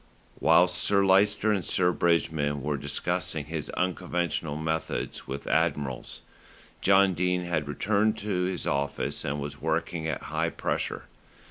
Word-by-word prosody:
Whilst 90 Hz, +3 st, +5 dB
Sir 100 Hz, -1 st, +3 dB
Lyster 105 Hz, +3 st, +4 dB
and 100 Hz, -3 st, 0 dB
Sir 90 Hz, -1 st, +2 dB
Bridgman 80 Hz, -5 st, +1 dB
were 75 Hz, +1 st, 0 dB
discussing 70 Hz, 0 st, -2 dB
his -, -, -4 dB
unconventional 85 Hz, -4 st, -1 dB
methods 80 Hz, +1 st, -3 dB
with 70 Hz, +1 st, -5 dB
admirals, 65 Hz, -4 st, -1 dB, 0.6 s
John 95 Hz, 0 st, +5 dB
Dene 90 Hz, +1 st, 0 dB
had 80 Hz, -4 st, -1 dB
returned 105 Hz, +8 st, +1 dB
to 100 Hz, -4 st, -1 dB
his 90 Hz, -2 st, -2 dB
office 70 Hz, 0 st, -2 dB
and 75 Hz, +1 st, -2 dB
was 70 Hz, 0 st, -6 dB
working 80 Hz, 0 st, -1 dB
at 80 Hz, -, -3 dB
high -, -, -1 dB
pressure. -, -, -3 dB
85 Hz, 135 wpm, -27 LUFS, 75-95 Hz, 0.6 s, Whilst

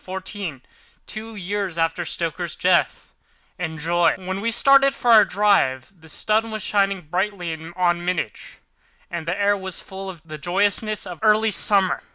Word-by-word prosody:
FLORENCE 190 Hz, 0 st, -6 dB
BRAM 175 Hz, -11 st, -6 dB, 0.4 s
STOKER 220 Hz, -1 st, -7 dB, 0.6 s
Dracula's 165 Hz, 0 st, -3 dB
Guest 180 Hz, -1 st, +2 dB, 0.6 s
When 175 Hz, +3 st, -1 dB
we 230 Hz, -, 0 dB
started 275 Hz, +3 st, +5 dB
for 240 Hz, -, +1 dB
our 220 Hz, -2 st, +9 dB
drive 195 Hz, -8 st, +1 dB
the 160 Hz, -2 st, -17 dB
sun 220 Hz, +6 st, 0 dB
was 215 Hz, -2 st, -4 dB
shining 195 Hz, -2 st, +1 dB
brightly 180 Hz, +1 st, -2 dB, 0.2 s
on 175 Hz, -1 st, +1 dB
Munich, 175 Hz, -, -2 dB, 0.7 s
and 170 Hz, -1 st, -5 dB
the 180 Hz, +4 st, -2 dB
air 205 Hz, 0 st, +3 dB
was 190 Hz, -2 st, -5 dB
full 195 Hz, 0 st, -8 dB
of 170 Hz, -5 st, -10 dB
the 155 Hz, -1 st, -8 dB
joyousness 205 Hz, +6 st, 0 dB
of 175 Hz, -4 st, -8 dB
early 215 Hz, 0 st, +3 dB
summer. 195 Hz, -2 st, +2 dB
190 Hz, 145 wpm, -22 LUFS, 175-210 Hz, 0.7 s, our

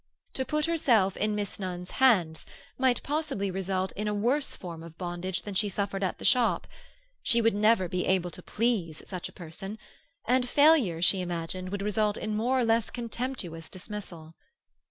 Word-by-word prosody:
To 260 Hz, -, -1 dB
put 300 Hz, +2 st, 0 dB
herself 240 Hz, -, +3 dB
in 210 Hz, 0 st, 0 dB
Miss 205 Hz, -1 st, -3 dB
Nunn's 180 Hz, -2 st, -5 dB
hands 185 Hz, -12 st, +4 dB, 0.3 s
might 260 Hz, -2 st, +2 dB
possibly 285 Hz, -10 st, -1 dB
result 190 Hz, 0 st, -1 dB
in 210 Hz, +1 st, -4 dB
a 210 Hz, -, 0 dB
worse 255 Hz, +8 st, +1 dB
form 170 Hz, -3 st, -8 dB
of 165 Hz, 0 st, -11 dB
bondage 175 Hz, 0 st, -3 dB
than 205 Hz, -, -6 dB
she 205 Hz, +2 st, +1 dB
suffered 200 Hz, 0 st, -2 dB
at 185 Hz, -, -1 dB
the -, -, -6 dB
shop; 245 Hz, -2 st, +3 dB, 0.6 s
she 235 Hz, -, +3 dB
would 225 Hz, 0 st, +3 dB
never 210 Hz, -2 st, +3 dB
be 180 Hz, +1 st, -2 dB
able 180 Hz, -2 st, +1 dB
to -, -, -8 dB
please 205 Hz, -9 st, -1 dB
such 180 Hz, -3 st, -5 dB
a -, -, -14 dB
person, 190 Hz, +5 st, -7 dB, 0.5 s
and 250 Hz, +1 st, +2 dB
failure, 280 Hz, -, +5 dB
she 190 Hz, +1 st, +4 dB
imagined, 175 Hz, +1 st, -4 dB
would 200 Hz, +1 st, -3 dB
result 210 Hz, 0 st, +1 dB
in 215 Hz, -1 st, -3 dB
more 245 Hz, +5 st, +1 dB
or -, -, +2 dB
less 225 Hz, 0 st, +2 dB
contemptuous 235 Hz, -9 st, -4 dB
dismissal. 180 Hz, -5 st, -8 dB
205 Hz, 175 wpm, -29 LUFS, 180-235 Hz, 0.6 s, failure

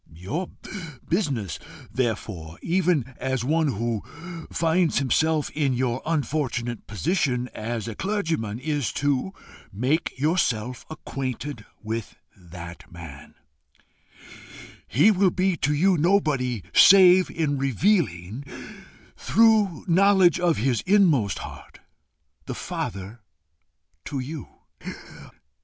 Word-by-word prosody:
Your 135 Hz, -, -4 dB, 0.6 s
business, 135 Hz, -, -1 dB, 0.3 s
therefore, 105 Hz, -9 st, -3 dB
even 170 Hz, -7 st, +1 dB
as 130 Hz, -2 st, -2 dB
one 160 Hz, +3 st, +2 dB
who 115 Hz, 0 st, -2 dB, 0.5 s
finds 165 Hz, 0 st, +2 dB
himself 155 Hz, +3 st, +1 dB
in 145 Hz, -4 st, 0 dB
your 125 Hz, 0 st, -1 dB
unfortunate 135 Hz, -7 st, -2 dB
position 125 Hz, -, 0 dB
as 115 Hz, 0 st, -4 dB
a 115 Hz, -, -4 dB
clergyman, 160 Hz, -, -2 dB
is 145 Hz, -1 st, -1 dB
to 145 Hz, +5 st, 0 dB, 0.4 s
make 130 Hz, -, -1 dB
yourself 125 Hz, -6 st, 0 dB
acquainted 135 Hz, -5 st, -5 dB, 0.2 s
with 110 Hz, 0 st, -4 dB, 0.2 s
that 85 Hz, -1 st, -11 dB
man: 80 Hz, -5 st, -11 dB, 1.5 s
he 150 Hz, -, +5 dB
will 195 Hz, -1 st, +3 dB
be 185 Hz, +1 st, +1 dB
to 145 Hz, -, 0 dB
you 185 Hz, +4 st, +3 dB
nobody 145 Hz, -, +1 dB
save 185 Hz, -1 st, +7 dB
in 145 Hz, -4 st, -1 dB
revealing, 130 Hz, -, 0 dB, 0.7 s
through 215 Hz, -6 st, +3 dB
knowledge 190 Hz, 0 st, +5 dB
of 175 Hz, -2 st, +2 dB
his 120 Hz, 0 st, +1 dB
inmost 170 Hz, -, +4 dB
heart, -, -, -12 dB, 0.7 s
the -, -, -4 dB
Father 100 Hz, +4 st, -5 dB, 0.8 s
to 140 Hz, -, -4 dB
you. 135 Hz, +1 st, -5 dB
140 Hz, 100 wpm, -25 LUFS, 115-170 Hz, 1.5 s, save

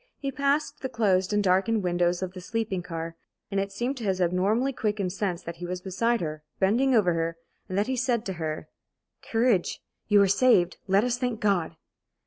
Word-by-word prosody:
He 275 Hz, -1 st, -3 dB
passed 280 Hz, +1 st, 0 dB
the 265 Hz, -, -3 dB
closed 195 Hz, -5 st, +1 dB
and 210 Hz, 0 st, +2 dB
darkened 195 Hz, +3 st, +2 dB
windows 175 Hz, 0 st, +1 dB
of 185 Hz, -1 st, -4 dB
the 185 Hz, -, -8 dB
sleeping 205 Hz, -1 st, -2 dB
car; 165 Hz, -1 st, -5 dB, 0.4 s
and 195 Hz, -, +1 dB
it 195 Hz, 0 st, -2 dB
seemed 245 Hz, +7 st, -2 dB
to 240 Hz, -, -6 dB
his 190 Hz, -3 st, 0 dB
abnormally 195 Hz, +9 st, +1 dB
quickened 205 Hz, -5 st, -1 dB
sense 190 Hz, -4 st, -2 dB
that 170 Hz, 0 st, -7 dB
he 175 Hz, +1 st, -6 dB
was 180 Hz, 0 st, -3 dB
beside 230 Hz, +6 st, 0 dB
her, 155 Hz, -2 st, -4 dB, 0.2 s
bending 245 Hz, +7 st, +3 dB
over 185 Hz, -6 st, +4 dB
her, 165 Hz, 0 st, -2 dB, 0.3 s
and 185 Hz, -, -2 dB
that 205 Hz, -, +2 dB
he 260 Hz, -, -1 dB
said 245 Hz, -3 st, 0 dB
to 190 Hz, -, -2 dB
her: 155 Hz, -1 st, -3 dB, 0.5 s
"Courage! 225 Hz, -5 st, +1 dB, 0.3 s
You 210 Hz, -1 st, +5 dB
are -, -, +3 dB
saved! 190 Hz, -4 st, +4 dB
Let 195 Hz, +2 st, +4 dB
us 245 Hz, 0 st, 0 dB
thank 245 Hz, -4 st, -1 dB
God!" 195 Hz, -7 st, +1 dB
195 Hz, 200 wpm, -27 LUFS, 180-235 Hz, 0.5 s, You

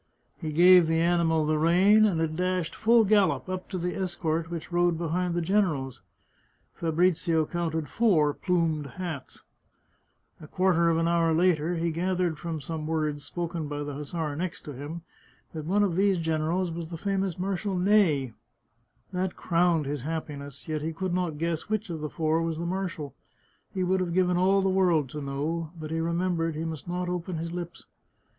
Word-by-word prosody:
He 155 Hz, -3 st, -4 dB
gave 175 Hz, +2 st, +7 dB
the 160 Hz, 0 st, +2 dB
animal 165 Hz, -2 st, +2 dB
the 155 Hz, 0 st, +1 dB
rein, 190 Hz, +7 st, +5 dB
and 185 Hz, -6 st, +1 dB
it 160 Hz, -1 st, -1 dB
dashed, 180 Hz, -1 st, -1 dB
full 230 Hz, 0 st, +4 dB
gallop, 205 Hz, -2 st, +3 dB
up 185 Hz, 0 st, -5 dB
to 190 Hz, -, -3 dB
the 180 Hz, 0 st, -2 dB
escort 170 Hz, -3 st, -2 dB
which 170 Hz, 0 st, -6 dB
rode 175 Hz, -1 st, +2 dB
behind 170 Hz, +1 st, -1 dB
the 175 Hz, -, 0 dB
generals. 160 Hz, -, 0 dB, 0.7 s
Fabrizio 165 Hz, -1 st, +1 dB
counted 160 Hz, -2 st, -2 dB
four 160 Hz, -, +3 dB
plumed 165 Hz, -5 st, 0 dB
hats. 170 Hz, -7 st, -6 dB, 1.0 s
A 155 Hz, -, -11 dB
quarter 175 Hz, -1 st, +2 dB
of 165 Hz, -, +2 dB
an 165 Hz, 0 st, +1 dB
hour 165 Hz, -1 st, +2 dB
later 170 Hz, -1 st, +2 dB
he 170 Hz, 0 st, 0 dB
gathered 175 Hz, -1 st, -1 dB
from 165 Hz, -2 st, -4 dB
some 155 Hz, +2 st, -5 dB
words 155 Hz, -2 st, -1 dB
spoken 170 Hz, -2 st, -4 dB
by 145 Hz, 0 st, -4 dB
the 145 Hz, 0 st, -5 dB
hussar 150 Hz, +1 st, -4 dB
next 175 Hz, +2 st, -4 dB
him 145 Hz, +4 st, -7 dB, 0.5 s
that 155 Hz, -2 st, -5 dB
one 200 Hz, +5 st, +2 dB
of 185 Hz, -5 st, 0 dB
these 195 Hz, 0 st, +3 dB
generals 165 Hz, +2 st, 0 dB
was 165 Hz, -1 st, -6 dB
the 170 Hz, -, -6 dB
famous 195 Hz, -1 st, -1 dB
Marshal 190 Hz, +1 st, -2 dB
Ney. 180 Hz, -, +3 dB, 0.8 s
That 185 Hz, 0 st, -2 dB
crowned 170 Hz, -3 st, +1 dB
his 145 Hz, -1 st, -3 dB
happiness; 145 Hz, -2 st, -6 dB
yet 155 Hz, -1 st, -2 dB
he 160 Hz, +2 st, -3 dB
could 185 Hz, +2 st, -3 dB
not 175 Hz, -4 st, -1 dB
guess 165 Hz, +3 st, -2 dB
which 215 Hz, -3 st, -2 dB
of 160 Hz, -, -4 dB
the 150 Hz, -, -3 dB
four 160 Hz, +1 st, 0 dB
was 165 Hz, -1 st, -2 dB
the 170 Hz, -, -3 dB
marshal. 175 Hz, -5 st, -3 dB, 0.6 s
He 185 Hz, -, -2 dB
would 190 Hz, +1 st, +1 dB
have 175 Hz, -2 st, -2 dB
given 180 Hz, -1 st, +3 dB
all 190 Hz, +2 st, +3 dB
the -, -, +2 dB
world 180 Hz, -7 st, +2 dB
to 150 Hz, -1 st, -5 dB
know, 150 Hz, +4 st, -3 dB
but 155 Hz, 0 st, -6 dB
he 165 Hz, -, -1 dB
remem 170 Hz, +2 st, 0 dB
bered 165 Hz, -1 st, -1 dB
he 160 Hz, +2 st, -3 dB
must 160 Hz, -2 st, -6 dB
not 180 Hz, +1 st, -2 dB
open 180 Hz, 0 st, -3 dB
his 165 Hz, +1 st, -4 dB
lips. 175 Hz, -1 st, -6 dB
170 Hz, 185 wpm, -27 LUFS, 155-180 Hz, 1.0 s, gave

